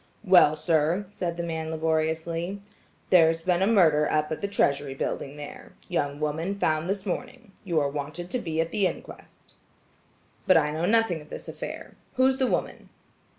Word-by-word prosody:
"Well, 180 -6 +6
sir," 160 +4 +1
said 175 -4 -4
the 170 - -2
man 160 -1 -3
laboriously, 160 +3 -1 0.5
"there's 165 -2 +5
been 180 0 +1
a 195 - +3
murder 160 -9 +4
up 150 0 0
at 155 - -3
the 200 - -1
Treasury 140 -8 +1
building 140 +1 -4
there. 145 -1 -10
Young 145 -5 -2
woman 160 +6 -2
found 155 -2 0
this 195 -1 -2
morning. 195 +1 -5
You're 160 -7 +1
wanted 150 +5 -5
to 250 - 0
be 160 -6 -3
at 165 0 0
the 200 -3 +2
inquest." - - -10 0.9
"But 185 - +7
I 150 -2 +2
know 160 +3 -1
nothing 225 -6 +2
of 150 - -16
this - - -8
affair. - - -7 0.2
Who's 260 +1 +3
the 260 - +2
woman?" - - -3
165 Hz, 170 wpm, -26 LUFS, 155-185 Hz, 0.9 s, But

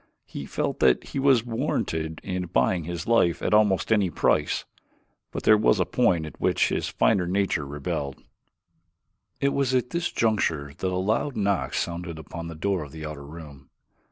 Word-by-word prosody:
He 70 - -7
felt - - -2
that 65 -2 +4
he - - -3
was 135 -4 +4
warranted 80 -8 -2
in 90 -2 -3
buying 85 -1 +1
his 85 0 -4
life 115 -8 +2
at - - 0
almost 105 -1 +3
any 105 -4 +3
price; - - +1 0.6
but - - -5
there 110 - +7
was 105 -1 +3
a 90 - +3
point 90 -10 +2
at 75 - -11
which - - +2
his - - -1
finer 95 -5 +2
nature 90 -6 0
rebelled. 70 -1 -3 1.2
It 140 - +2
was 135 -2 +1
at 125 -1 0
this 170 0 -1
juncture 85 -11 0
that 95 - -3
a 90 - -1
loud 110 +8 0
knock 100 -2 0
sounded 85 -1 -3
upon 85 +2 -7
the 85 - -7
door 95 +2 -1
of 75 -2 -8
the 80 -1 -7
outer 75 -2 -7
room. 75 -3 -11
90 Hz, 180 wpm, -26 LUFS, 80-110 Hz, 1.2 s, there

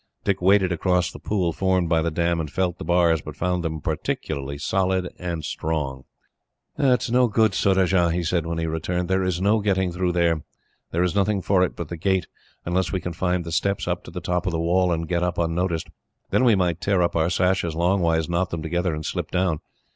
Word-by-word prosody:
Dick 100 -2 0
waded 95 0 +4
across 90 +1 +1
the - - -10
pool 90 -5 -1
formed 95 0 +1
by 80 -1 +2
the 85 - 0
dam, 85 +1 0
and 80 -2 -3
felt 90 +2 -1
the - - -5
bars, 85 -1 +3
but 75 0 -8
found 90 +1 -1
them 80 -1 -3
perfectly 70 -1 -3
solid 95 +3 0
and 85 -4 -4
strong. 70 -5 -3 0.7
"It 130 -5 +2
is - - -3
no 125 0 +4
good, 110 -2 +2
Surajah," 95 -3 +3
he 85 +1 -1
said, 85 0 0
when 85 0 -2
he 85 - -1
returned. 85 +3 -2
"There 95 0 +2
is 95 -2 -1
no 105 +4 +3
getting 95 -3 +1
through 90 0 -1
there. 85 -2 +2 0.5
There 85 +2 0
is 90 - 0
nothing 100 -1 +1
for 95 -2 +3
it 90 - +1
but 85 -3 -6
the 85 - -5
gate, 95 +2 +1 0.4
unless 90 +1 0
we 95 - -1
can 90 0 -5
find 90 0 -1
the 85 - -5
steps 100 +3 0
up - - -2
to - - -9
the - - -6
top 90 +2 -1
of - - +1
the 80 - -1
wall, 90 +2 +2
and 80 -1 -1
get 85 0 0
up 90 -1 -1
unnoticed. 85 0 -1 0.4
Then 130 - +3
we 115 -4 +5
might 90 -3 0
tear 95 -3 +2
up 85 - 0
our 80 0 +2
sashes 90 -2 +1
longways, 85 -2 +2
knot 85 +1 0
them 85 -3 -4
together, 85 +1 -1
and 75 0 -6
slip - - -3
down. 90 -4 0
90 Hz, 225 wpm, -24 LUFS, 85-95 Hz, 0.7 s, we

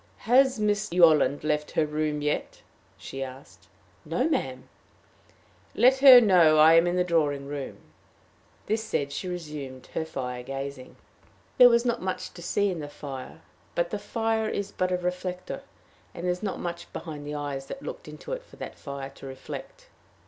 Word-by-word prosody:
"Has 260 +1 +4
Miss 210 -2 0
Yolland 160 -5 +4
left 150 -1 0
her 160 - +2
room 150 0 -2
yet?" 150 - -2 0.3
she 135 - -7
asked. 130 -11 -9 0.4
"No, 170 - 0
ma'am." 130 - -2 1.1
"Let 260 +2 +5
her 265 -2 +11
know 180 -8 +5
I 155 +1 +8
am 165 +1 +5
in 175 - 0
the 180 - +3
drawing 150 -5 0
room." 140 -1 -6 0.9
This 220 +1 -1
said, 140 -9 -2
she 165 +6 -4
resumed 150 -7 -6
her 160 - -1
fire 125 -5 -5
gazing. 135 0 -7 0.6
There 250 -1 +10
was 235 0 +3
not 240 -1 0
much 185 0 -4
to 175 - -11
see 200 +3 +1
in 175 - -4
the 145 -1 -6
fire, 135 -3 -8 0.3
for 170 - +3
the 175 +4 -5
fire 225 0 -1
is 200 0 -3
but 185 0 -1
a 180 - +2
reflector, 180 0 -4 0.5
and 170 - -7
there 180 - +1
was 180 - -4
not 205 -3 -3
much 170 -1 -6
behind 150 -3 -7
the 150 - -4
eyes 140 -2 -4
that 275 - -8
looked - - -7
into - - -7
it - - -4
for - - -18
that - - -8
fire 140 -1 -6
to 135 - -11
reflect. 135 - -9
165 Hz, 180 wpm, -27 LUFS, 145-205 Hz, 1.1 s, her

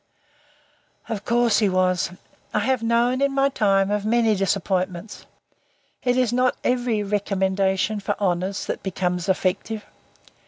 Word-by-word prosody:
Of 210 -3 -4
course 235 -2 +3
he 210 -3 +3
was. 185 -1 +1 0.5
I 210 - +2
have 260 +2 +1
known, 235 +3 +2
in 280 0 +2
my 275 0 +3
time, 195 -6 +2
of 210 -1 0
many 225 0 +3
disappointments. 190 0 -2 0.7
It 245 0 +1
is 250 -2 +2
not 250 +1 +2
every 245 -4 0
recommendation 195 0 0
for 200 - -3
honours 185 0 -1
that - - -4
becomes 180 -1 -2
effective. 195 +3 -1
205 Hz, 130 wpm, -23 LUFS, 190-235 Hz, 0.7 s, course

